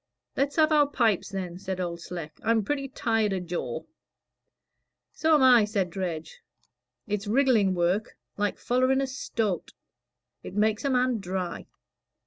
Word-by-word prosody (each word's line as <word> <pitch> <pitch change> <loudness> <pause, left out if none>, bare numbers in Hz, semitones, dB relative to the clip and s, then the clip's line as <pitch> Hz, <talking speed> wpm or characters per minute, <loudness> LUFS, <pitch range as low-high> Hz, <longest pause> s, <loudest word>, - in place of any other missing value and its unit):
"Let's 280 +1 0
have 315 -1 +4
our 295 -2 +5
pipes, 225 -9 +1
then," 185 -3 -5
said 190 -1 -4
Old 170 -2 -3
Sleck; 170 -2 -7
"I'm 225 -1 +2
pretty 275 +4 -2
well 270 - -25
tired 225 -5 +1
o' 190 - -1
jaw." 180 0 -4 1.3
"So 320 0 +3
am 290 - +4
I," 245 -4 +7
said 200 -4 -1
Dredge. 180 - -5 0.6
"It's 210 0 -3
wriggling 225 -5 +3
work 180 +5 0 0.2
like 205 0 -1
follering 255 +2 +2
a - - +1
stoat. 225 - -3 0.7
It - - -9
makes 215 +1 +1
a - - +2
man 250 -2 +2
dry. 185 -2 -4
210 Hz, 150 wpm, -27 LUFS, 185-255 Hz, 1.3 s, I